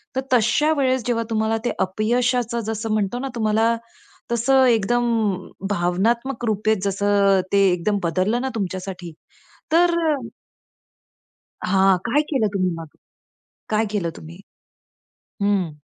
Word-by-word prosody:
तर 265 - 0
तशा 250 +6 +3
वेळेस 260 -2 +1
जेव्हा 230 -2 0
तुम्हाला 220 0 +1
ते - - +1
अपयशाचं 235 +4 0
जसं 225 0 -3
म्हणतो 215 +3 -1
ना, 270 - -3
तुम्हाला 225 +1 +2 0.6
तसं 260 +3 +3
एकदम 240 0 +2 0.6
भावनात्मक 225 +8 0
रूपे 215 0 +1
जसं 200 0 +2
ते 200 - +5
एकदम 180 +4 0
बदललं 185 +8 0
ना 265 - -2
तुमच्यासाठी 185 -3 -5 0.6
तर 345 +1 +4 1.7
हां, 190 0 +4
काय 240 +5 +2
केलं 260 -8 +1
तुम्ही 185 -2 +1
मग? 165 -1 -8 0.8
काय 215 +1 +2
केलं 185 -6 -1
तुम्ही? 165 +3 -11 1.1
हं. 200 -5 +1
220 Hz, 115 wpm, -22 LUFS, 195-240 Hz, 1.7 s, ते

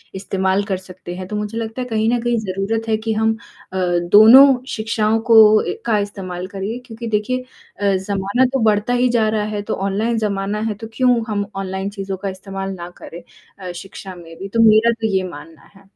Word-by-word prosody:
इस्तेमाल 190 0 0
कर 195 -3 -2
सकते 185 -1 -10
हैं। 185 0 -7
तो 210 - -5
मुझे 210 +2 -4
लगता 225 +2 -4
है, 250 - -4
कहीं 220 -1 0
न 245 - +1
कहीं, 240 0 0
ज़रूरत 215 +3 -3
है 220 - +2
कि 220 +1 -2
हम 220 +1 +1 0.4
अ, - - -3 0.3
दोनों 225 +6 +9 0.2
शिक्षाओं 220 -2 0
को 215 -1 +7
ए - - -1
का 225 -2 +2
इस्तेमाल 185 -3 -5
करें, 200 +4 -5
क्योंकि 230 -1 -8
देखिए 220 +4 -1 0.4
अ, 200 -1 +2
ज़माना 200 +5 0
तो 270 - +1
बढ़ता 215 +2 +2
ही 245 0 +2
जा 235 -2 +2
रहा 215 -1 0
है। 210 -1 -3
तो - - +1
ऑनलाइन 205 +4 -1
ज़माना 205 -1 -2
है, - - -1
तो 225 +2 -9
क्यों 245 0 +2
हम 205 -2 -1
ऑनलाइन 190 0 -3
चीज़ों 195 -1 -5
का 195 +1 -4
इस्तेमाल 195 0 -6
ना 175 -2 -8
करें 170 - -9 0.4
अ, 185 -2 -6
शिक्षा 190 +1 -9
में 165 -2 -12
भी? 195 - -6
तो 230 - -2
मेरा 220 +2 +5
तो 220 - +1
ये 190 - +1
मानना 150 -1 -13
है। 195 0 -20
205 Hz, 210 wpm, -19 LUFS, 190-225 Hz, 0.4 s, दोनों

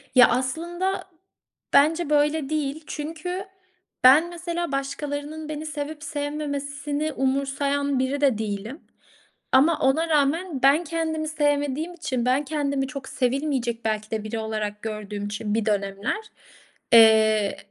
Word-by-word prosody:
Ya, 250 0 +9
aslında, 345 +9 -1 0.7
bence 320 +3 +4
böyle 295 -1 +2
değil. 305 0 -2
Çünkü 330 +5 -5 0.6
ben, 290 +7 +7
mesela 345 -1 -4
başkalarının 290 +2 -4
beni 305 0 -5
sevip 300 0 -5
sevmemesini 290 0 -3
umursayan 275 +1 0
biri 265 +2 -1
de 270 -6 +3
değilim. 215 +5 -5 0.7
Ama 300 +4 +4
ona 315 +4 +2
rağmen 305 +1 +1
ben 280 +5 +5
kendimi 320 -1 -2
sevmediğim 295 +1 0
için, 270 -8 -3
ben 260 +4 +2
kendimi 280 -2 -1
çok 275 -1 -7
sevilmeyecek 250 -3 -1
belki 215 -1 -2
de 220 -1 -2
biri 215 +1 -4
olarak 215 -1 -3
gördüğüm 210 -2 -5
için 205 +1 -3
bir 225 -1 0
dönemler, 200 - -1 0.8
eee, 220 -2 +6
285 Hz, 120 wpm, -24 LUFS, 245-310 Hz, 0.8 s, Ya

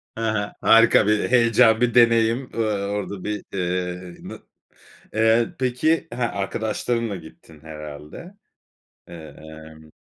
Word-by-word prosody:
Ha 115 - -6
ha. 105 -1 -3
Harika 115 -2 +5
bir 105 +2 +1
heyecan, 115 -2 +4
bir 120 -1 +2
deneyim. 115 +1 +3
Iıı, 105 -3 -1
orada 100 -2 -5
bir, 105 -1 -4
eee, 90 -1 -3 0.2
na - - -9 0.7
eee 110 +1 +2
peki 130 +6 0
ha 125 - -3
arkadaşlarınla 110 +2 -2
gittin 80 -2 -14
herhâlde. 75 - -10 0.7
Iıı, 80 -4 -11 0.4
ımm 80 0 -18
105 Hz, 120 wpm, -22 LUFS, 90-115 Hz, 0.7 s, Harika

